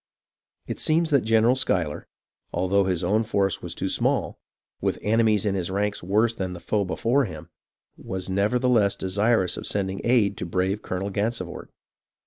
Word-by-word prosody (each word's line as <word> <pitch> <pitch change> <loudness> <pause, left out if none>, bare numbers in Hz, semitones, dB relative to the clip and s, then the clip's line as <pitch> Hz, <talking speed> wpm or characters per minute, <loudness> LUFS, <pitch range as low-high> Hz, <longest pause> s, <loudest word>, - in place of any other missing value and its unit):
It - - -5
seems 160 +1 +2
that 140 -3 +4
General 115 +2 +3
Schuyler, 90 - 0 0.4
although 95 +2 +1
his 90 -1 -1
own 105 +5 +2
force 100 -4 0
was - - -6
too - - -2
small, - - 0 0.4
with - - 0
enemies 110 -1 +2
in 100 - +1
his 95 -2 -2
ranks 105 +2 -1
worse 105 +6 +2
than 95 -4 -4
the 90 - -8
foe 105 +3 0
before 120 +8 +1
him, 80 -4 -9 0.5
was 95 -1 -4
nevertheless 105 +2 +2
desirous 100 +1 +1
of - - -5
sending 95 -1 -2
aid 115 -5 +2
to - - -4
brave 95 +4 -1
Colonel 95 +2 -4
Gansevoort. 100 -3 -3
100 Hz, 160 wpm, -25 LUFS, 95-115 Hz, 0.5 s, that